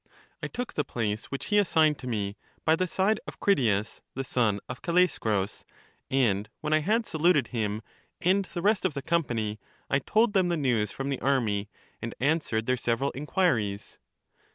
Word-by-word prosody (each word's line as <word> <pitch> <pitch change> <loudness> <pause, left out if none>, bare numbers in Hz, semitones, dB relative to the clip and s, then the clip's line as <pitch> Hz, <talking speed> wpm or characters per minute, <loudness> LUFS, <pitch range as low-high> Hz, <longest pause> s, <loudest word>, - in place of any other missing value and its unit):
I - - -2
took 245 0 -5
the 150 - 0
place 110 -4 -2
which 140 - -5
he 205 - +6
assigned 160 -6 +3
to 130 - -7
me, 105 -4 -2 0.3
by 160 - +5
the 185 +2 0
side 195 +5 +1
of - - -8
Critias 115 - +1
the 135 - -2
son 115 -6 +1
of 125 - -7
Callaeschrus, 115 - +1 0.5
and 105 -6 +2
when 155 0 -1
I 155 - +5
had 220 +8 +1
saluted 160 - +2
him 110 -2 -2 0.4
and 190 +2 +2
the 175 -1 -6
rest 210 0 +3
of 180 -6 0
the 140 - -4
company, 120 -10 0 0.3
I 140 - +4
told 215 - +2
them 185 -3 +3
the 170 - +1
news 120 -8 +1
from 135 +1 -4
the 135 - -1
army, 110 -7 +1 0.3
and 115 - -5
answered 140 -6 +1
their 130 +1 +1
several 120 +3 0
inquiries. 130 - -1
135 Hz, 175 wpm, -28 LUFS, 110-170 Hz, 0.5 s, he